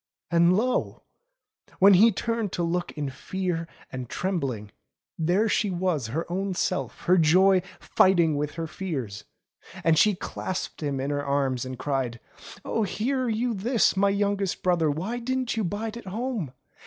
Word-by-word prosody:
And 170 +1 +5
lo! 250 +4 -1 0.7
when 195 +1 +7
he 215 +5 +7
turned 230 0 -2
to 175 - -1
look 175 +1 -1
in 145 -3 -3
fear 170 +3 -3 0.2
and 130 -2 -6
trembling, 135 - -2 0.4
there 180 +7 +2
she 210 -1 +1
was 175 -8 -1
her 155 +9 -2
own 190 +2 -2
self, 135 -7 -2
her 180 +1 +4
joy 185 +4 +5 0.2
fighting 170 -5 +3
with 145 0 -2
her 165 -1 -3
fears. 135 - -5 0.6
And 160 -1 +4
she 210 +2 +4
clasped 185 0 -5
him 140 -3 -2
in 135 +2 -2
her 145 0 -1
arms 135 -3 0
and 130 0 -6
cried: 130 -4 -2 0.5
0h, 220 -2 0
hear 255 +5 -1
you 230 +2 0
this, 225 +2 +2
my 200 +1 +3
youngest 200 -1 -1
brother. 175 -4 +2
Why 185 +12 -2
didn't 255 0 -1
you 225 - 0
bide 210 +4 -3
at 235 -4 -9
home 220 - -3
180 Hz, 160 wpm, -26 LUFS, 145-205 Hz, 0.7 s, when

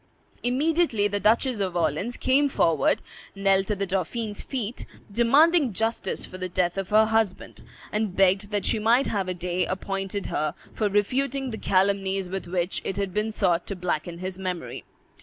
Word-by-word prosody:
Immediately 265 -3 +2
the 205 0 -1
Duchess 230 +3 +2
of 185 -3 -1
Orleans 170 - 0
came 280 +2 +3
forward, 165 - +2 0.3
knelt 195 -1 +2
at 210 - 0
the 195 - -1
dauphin's 205 +3 -2
feet, 245 -3 -4 0.2
demanding 275 - +4
justice 225 +4 -2
for 185 - -10
the 185 0 -3
death 175 -1 0
of 195 -1 -3
her 215 +1 +5
husband, 220 -3 -1 0.3
and 210 -3 -1
begged 195 +1 +3
that 205 -2 -1
she 220 - +1
might 235 +5 +3
have 195 -3 -1
a 185 - -2
day 180 +1 -1
appointed 195 +2 -3
her 150 0 -2 0.2
for 210 -2 0
refuting 260 +6 0
the 220 - -5
calumnies 195 0 +1
with 190 -1 -4
which 175 +1 -1
it 195 - -3
had 195 -2 -2
been 215 +2 0
sought 180 -5 +1
to 200 - -3
blacken 175 -2 -3
his 185 +1 -5
memory. 185 -2 -5
200 Hz, 175 wpm, -25 LUFS, 185-225 Hz, 0.3 s, her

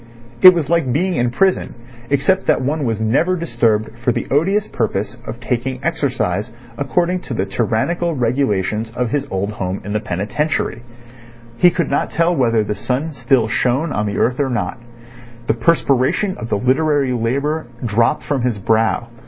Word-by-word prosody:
It 185 -1 +10
was 160 -5 -1
like 165 -5 +1
being 180 +8 +1
in 120 -6 +1
prison, 190 +9 +1 0.3
except 185 +7 +1
that - - +3
one 145 +2 -1
was 115 -2 -1
never 135 +12 +2
disturbed 115 -8 0
for 120 +1 +1
the - - -2
odious 195 +9 +2
purpose 110 -3 -2
of 115 +2 -6
taking 125 +1 -2
exercise 125 - -1 0.2
according 175 +7 0
to 140 -8 -6
the 95 - 0
tyrannical 125 - -1
regulations 115 -4 0
of 125 -2 -1
his 140 0 -1
old 95 +2 -2
home 95 -2 -3
in 105 - -4
the 105 - +1
penitentiary. 115 - -2 0.8
He 175 - +6
could 170 -4 -2
not 140 - 0
tell 170 +1 +1
whether 115 -6 +2
the 105 - -2
sun 130 +9 -2
still 125 -2 +2
shone 130 +7 0
on 105 0 -1
the 100 - -3
earth 125 +3 +1
or 140 -2 +1
not. 110 -5 -2 0.7
The - - +2
perspiration 140 - +1
of 115 - -6
the 105 - +1
literary 135 +2 +1
labour 140 +6 -1 0.2
dropped 115 +1 +1
from 140 -3 -1
his 120 -3 0
brow. 110 +3 +1
125 Hz, 170 wpm, -18 LUFS, 110-155 Hz, 0.8 s, It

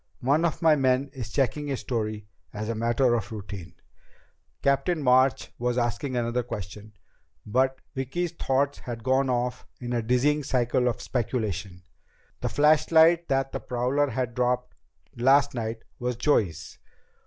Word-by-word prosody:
One 145 +6 +2
of 165 0 -2
my 160 -2 +6
men 135 0 +1
is 120 -5 -6
checking 145 +3 0
his 135 -3 -2
story 110 -3 -3 0.3
as 105 +1 -4
a - - 0
matter 120 +2 +2
of 115 -1 -2
routine." 100 -4 -8 0.9
Captain 145 +5 +2
March 130 +1 +3
was 120 0 0
asking 125 +2 -1
another 120 +1 0
question, 105 -2 -8 0.5
but 130 +4 +1
Vicki's 150 +6 -2
thoughts 140 -3 0
had 115 -2 -7
gone 130 +1 +2
off 125 0 -2
in 125 -1 -4
a 120 - +1
dizzying 125 +6 +2
cycle 125 -1 +1
of 120 - -2
speculation. 110 -7 -3 0.6
The - - -2
flashlight 160 +3 +4
that 135 0 0
the - - -3
prowler 130 +4 0
had 125 0 -2
dropped 125 0 0 0.4
last 135 +4 +4
night 115 -2 -4 0.2
was 125 0 -2
Joey's! 100 - 0
125 Hz, 145 wpm, -26 LUFS, 115-135 Hz, 0.9 s, my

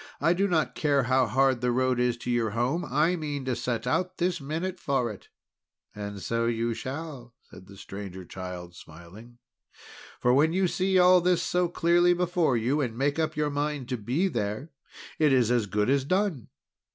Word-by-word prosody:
I 165 +4 +3
do 195 +3 +1
not 160 -5 0
care 145 -3 +1
how 130 0 +2
hard 130 +2 +2
the 125 0 +1
road 130 0 +1
is 125 -1 +1
to 120 - -4
your 120 -2 +1
home, 120 - -1
I 155 +7 +1
mean 145 -5 -4
to 130 -2 -1
set 120 0 -3
out 180 +8 -1
this 175 -2 -1
minute 165 +6 -4
for 130 -5 0
it." 100 - -12 0.7
"And 100 -1 -6
so 115 0 0
you 115 0 0
shall!" 130 -2 -7
said 95 - -15
the 100 0 -13
Stranger 95 -2 -8
Child 90 -1 -8
smiling; 85 +10 -14 0.8
"for 125 - +3
when 155 +5 +3
you 190 0 +2
see 190 +2 +1
all 180 0 +6
this 180 0 +2
so 180 0 +1
clearly 175 +1 +3
before 175 -6 +1
you, 130 +7 0
and 115 -4 -3
make 140 +4 0
up 155 -1 -1
your 150 -1 0
mind 145 -2 -2
to 125 - -1
be 125 - 0
there, 110 - -3 0.5
it 150 -2 +4
is 125 -3 +3
as 120 -4 +1
good 105 +1 0
as 135 +1 +2
done! 185 - -1
130 Hz, 190 wpm, -27 LUFS, 115-165 Hz, 0.8 s, all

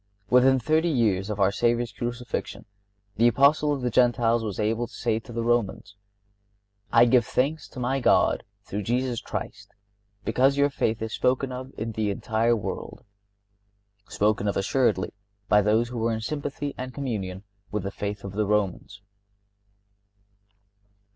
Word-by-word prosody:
(61) - - +4
Within 130 0 +4
thirty 155 +7 +2
years 110 - +1
after 105 -2 0
our 95 - +3
Savior's 120 +2 +1
Crucifixion 120 +1 -5 0.5
the 115 +2 +5
Apostle 140 +5 +4
of 140 -2 -1
the 125 - 0
Gentiles 120 -1 +3
was 105 -4 -4
able 110 +3 0
to - - -20
say 115 -2 0
to 115 - -13
the 115 0 -2
Romans: 115 -4 -1 1.0
"I 115 +1 +7
give 120 0 +4
thanks 145 +7 -1
to 130 - -10
my 130 +2 0
God 125 - +3 0.2
through 105 - -4
Jesus 120 +3 -1
Christ - - -7 0.5
because 135 +2 +2
your 140 0 +3
faith 110 -4 -1
is 110 - -4
spoken 130 +1 +1
of 130 +1 -7
in 110 +1 -3
the 110 -1 -1
entire 115 +3 +1
world"(62)—spoken 100 0 -5
of 100 - 0
assuredly 105 0 +1 0.3
by 105 - +5
those 110 +3 +2
who 120 -1 -5
were 115 +1 +1
in 110 - -3
sympathy 145 +2 -4
and 130 0 -6
communion 100 -9 -4 0.3
with 105 -2 -2
the 100 - -3
faith 100 0 -5
of 100 - -6
the 105 +1 -1
Romans. 100 -1 -1
115 Hz, 155 wpm, -26 LUFS, 100-125 Hz, 1.0 s, I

